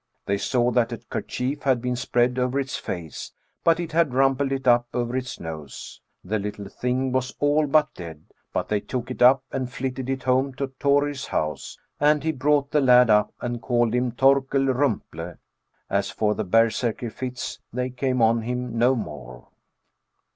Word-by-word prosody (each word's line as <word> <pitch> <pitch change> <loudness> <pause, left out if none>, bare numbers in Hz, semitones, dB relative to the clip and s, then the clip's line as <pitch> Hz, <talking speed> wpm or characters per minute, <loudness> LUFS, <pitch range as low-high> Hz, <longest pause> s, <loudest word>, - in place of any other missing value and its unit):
They 100 0 0
saw 125 +1 +1
that 120 -1 +1
a - - -3
kerchief 135 +3 -4
had 130 -2 +2
been 125 +1 -2
spread 125 0 +1
over 125 +2 0
its 135 -1 -3
face, 85 -4 -6 0.3
but 165 0 +4
it 170 -2 -4
had 155 -5 +2
rumpled 135 +1 +2
it 135 -1 -2
up 120 0 +4
over 120 0 -1
its 130 -1 -4
nose; 80 -4 -8 0.2
the 105 +4 -1
little 100 0 -5
thing 125 +3 -1
was 130 0 -1
all 145 +1 +2
but 150 +1 +3
dead> 80 -3 -9 0.3
but - - -2
they 105 - 0
took 125 +2 -5
it - - -7
up 130 +2 +6
and 130 -2 -3
flitted 130 0 -4
it 135 -1 -2
home 130 +1 +1
to 135 +1 -3
Thorir's 145 0 +1
house, 75 -1 -3 0.2
and 150 0 +3
he 160 - +1
brought 145 0 +1
the 150 - +3
lad 125 -2 +6
%p, 105 -1 +4
and 120 -1 -3
called 120 -2 +1
him 125 0 +1
ThorkellEumple; 135 - +1 0.5
as - - 0
for 105 -1 0
the 110 - -3
berserkr 115 +3 +1
fits, 125 0 -5
they 125 +2 -2
came 125 -1 0
on 115 +1 +3
him 125 0 -3
no 125 +3 +4
more." 75 - -8
125 Hz, 175 wpm, -24 LUFS, 115-135 Hz, 0.5 s, up